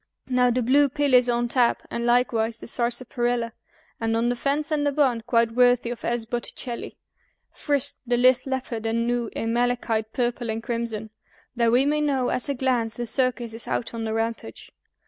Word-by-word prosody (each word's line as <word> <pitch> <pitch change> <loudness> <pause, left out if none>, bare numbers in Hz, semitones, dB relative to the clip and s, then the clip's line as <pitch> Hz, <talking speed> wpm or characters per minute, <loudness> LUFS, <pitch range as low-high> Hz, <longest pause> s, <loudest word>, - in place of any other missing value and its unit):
Now 250 -1 +3
the 245 +1 +1
blue 280 +4 +4
pill 285 0 0
is 250 -1 +6
on 240 0 +1
tap, 240 -1 +2
and 235 0 -2
likewise 235 -2 +2
the - - -10
sarsaparilla, 240 -1 -1 0.5
And 225 0 0
on 235 +1 +1
the 245 - 0
fence 285 +5 -1
and 300 -1 +1
the 285 - +2
barn, 270 -5 +2
quite 230 -1 +3
worthy 245 0 +3
of 240 - -7
S. 235 -1 -1
Botticelli, 240 +1 -5 0.5
Frisk 285 -2 -1
the 240 0 +2
lithe 255 +1 +4
leopard 250 -4 -3
and 230 +1 0
gnu, 240 -1 -1
in 225 0 -2
malachite, 235 -2 0
purple, 240 -1 -2
and 220 +1 -3
crimson, 230 -3 -4 0.4
That 235 -1 +2
we 250 +3 +4
may 300 +1 +1
know 270 -4 +1
at 255 - -2
a 280 - 0
glance 245 -4 0
the 240 - -3
circus 245 -1 0
is 225 - -5
out 235 - -2
on 230 -1 -4
the 220 0 -2
rampage. 225 - -4
240 Hz, 190 wpm, -24 LUFS, 230-255 Hz, 0.5 s, is